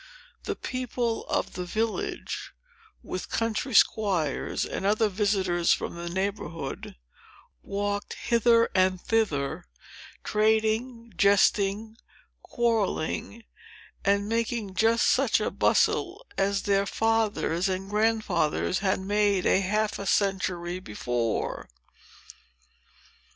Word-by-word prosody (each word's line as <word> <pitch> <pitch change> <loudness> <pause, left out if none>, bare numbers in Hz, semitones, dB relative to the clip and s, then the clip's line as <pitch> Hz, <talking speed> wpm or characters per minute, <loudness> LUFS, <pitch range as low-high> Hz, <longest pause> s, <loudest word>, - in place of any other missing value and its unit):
The - - -2
people 245 -2 -3
of - - -1
the 180 - -4
village, 220 +5 -3 0.5
with 185 - -5
country 230 +2 -1
squires 185 -12 +2
and - - -5
other 215 +2 +2
visitors 190 -4 +1
from - - -3
the 170 0 -6
neighborhood, 185 -6 -4 0.7
walked 205 0 -3
hither 230 0 +3
and 185 0 +2
thither, 180 - -1 0.6
trading, 220 +2 0
jesting, 200 +3 +2 0.4
quarrelling, 230 -1 -1 0.6
and 200 +1 +2
making 230 -2 -2
just 225 +4 +3
such - - +3
a - - -1
bustle 390 +7 +1
as 195 0 0
their 200 0 +1
fathers 215 -5 0
and 190 +1 -3
grandfathers 215 -6 +1
had 190 -1 0
made 205 -1 +1
half 210 +3 +1
a 200 - -5
century 185 -3 0
before. 120 - -3
205 Hz, 100 wpm, -27 LUFS, 185-225 Hz, 0.7 s, hither